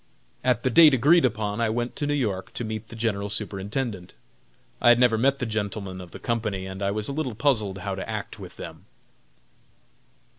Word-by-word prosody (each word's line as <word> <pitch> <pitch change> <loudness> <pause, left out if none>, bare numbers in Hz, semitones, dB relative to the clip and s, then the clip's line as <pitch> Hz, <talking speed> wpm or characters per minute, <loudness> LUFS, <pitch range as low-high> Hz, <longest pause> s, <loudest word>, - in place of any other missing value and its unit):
At 125 -3 +2
the 130 - +1
date 155 +1 +8
agreed 150 +6 +5
upon 110 -2 -1
I 115 - +2
went 120 +2 -2
to 145 - -1
New 145 - +1
York 105 -9 -2
to - - -4
meet 110 -1 -5
the 115 - -10
General 105 -3 -1
Superintendent. 100 0 -3 0.7
I - - +6
had 120 0 +6
never 125 -2 +5
met 135 +5 +2
the 125 - -2
gentlemen 100 -4 -3
of 90 - -10
the - - -9
company 110 -5 -2
and 95 +1 -7
I 100 - +1
was 105 +1 -1
a 140 - -3
little 135 -6 -2
puzzled 110 -7 +1
how 95 +1 -4
to 95 - -5
act - - -5
with - - -10
them. - - -9
110 Hz, 200 wpm, -25 LUFS, 100-125 Hz, 0.7 s, date